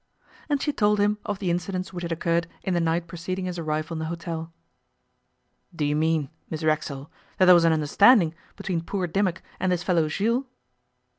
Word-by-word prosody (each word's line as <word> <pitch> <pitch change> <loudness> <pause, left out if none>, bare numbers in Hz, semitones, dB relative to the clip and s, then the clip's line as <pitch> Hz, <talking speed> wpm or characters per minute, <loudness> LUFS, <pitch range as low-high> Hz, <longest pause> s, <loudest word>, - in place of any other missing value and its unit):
And 290 -1 +2
she 295 +1 -1
told 210 -3 +2
him 210 +1 +2
of 205 - -2
the 190 -3 -1
incidents 185 +2 -3
which 175 - -5
had 170 -1 -4
occurred 170 0 0 0.2
in 190 - -1
the 175 - +2
night 165 +1 0
preceding 185 +2 -4
his 180 -1 -4
arrival 155 0 -2
in 160 - -4
the 160 - -3
hotel. 165 0 -5 1.2
'Do 150 - -1
you 145 0 +1
mean, 155 -1 +1 0.2
Miss 160 0 -5
Racksole, 155 -2 -1 0.3
that 185 - +5
there 180 - +9
was 170 -1 +5
an 165 - +5
understanding 165 - +5 0.2
between 175 -5 -2
poor 185 +2 -2
Dimmock 185 +1 -1 0.2
and 185 - +1
this 180 -1 0
fellow 165 -4 +2
Jules? 230 - 0
170 Hz, 195 wpm, -25 LUFS, 160-190 Hz, 1.2 s, there